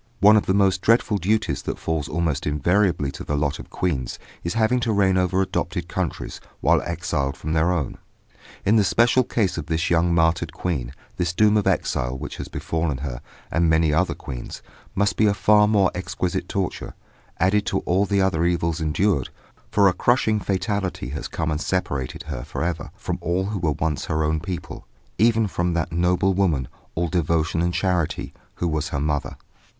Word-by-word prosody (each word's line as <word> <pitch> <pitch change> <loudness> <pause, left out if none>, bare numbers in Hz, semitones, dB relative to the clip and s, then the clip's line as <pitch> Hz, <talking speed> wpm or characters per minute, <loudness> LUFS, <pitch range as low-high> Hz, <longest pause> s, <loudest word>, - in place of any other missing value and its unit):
One 105 +2 +7
of 105 - +2
the 95 - +2
most 95 -2 +3
dreaded 110 -3 +3
duties 110 +5 0
that - - -4
falls 80 -3 -2
almost 80 -3 -1
invariably 85 0 +1
to - - -8
the 75 - -2
lot 70 0 -1
of - - -10
queens 70 -9 -2 0.3
is 85 +5 -2
having 115 +3 +2
to 115 -2 0
reign 100 -2 +3
over 95 +1 +2
adopted - - -3
countries - - -4 0.2
while - - +3
exiled 85 -5 -2
from 80 - -3
their 80 +3 +2
own. 85 -6 -2 0.7
In 110 +3 +4
the 105 - +5
special 120 +6 +4
case 105 -8 0
of 75 - -7
this 80 +1 -1
young 85 +1 +3
martyred 80 -1 +2
queen, 70 -9 -3 0.2
this 85 -1 0
doom 105 +3 +4
of 105 - +2
exile 60 +2 0
which - - -7
has - - -6
befallen 80 -4 -2
her, 60 -2 -5 0.3
and 85 0 +2
many 80 -1 +3
other 90 +4 +1
queens, 65 -3 -8 0.3
must 100 +1 +1
be 110 - +4
a 100 - +2
far 105 +1 +5
more 100 -3 +3
exquisite 90 0 -3
torture, - - -3 0.4
added 100 +3 +2
to 95 - 0
all 95 +3 +1
the 100 0 +2
other 85 -4 +1
evils 85 -1 0
endured, 80 -1 +1 0.4
for 100 -1 +4
a 95 - +4
crushing 110 -1 +2
fatality 95 - -2
has 75 - -4
come 80 -1 -2
and 75 +1 -2
separated 70 -10 -2
her 70 -6 -5
for - - -4
ever 85 -1 -3
from - - -4
all 90 +3 0
who 100 0 -3
were 80 -3 +1
once 75 -1 -2
her 80 0 0
own 80 +1 +1
people, 90 +2 -6 0.3
even 115 0 +4
from 90 -3 -1
that 85 0 -1
noble 90 +3 +2
woman, 85 -10 +1 0.3
all 85 +1 0
devotion 80 -1 0
and 85 0 0
charity, 90 -5 -1 0.2
who 90 - -1
was 80 0 -1
her 70 - -2
mother. 75 0 -2
85 Hz, 190 wpm, -23 LUFS, 80-100 Hz, 0.7 s, One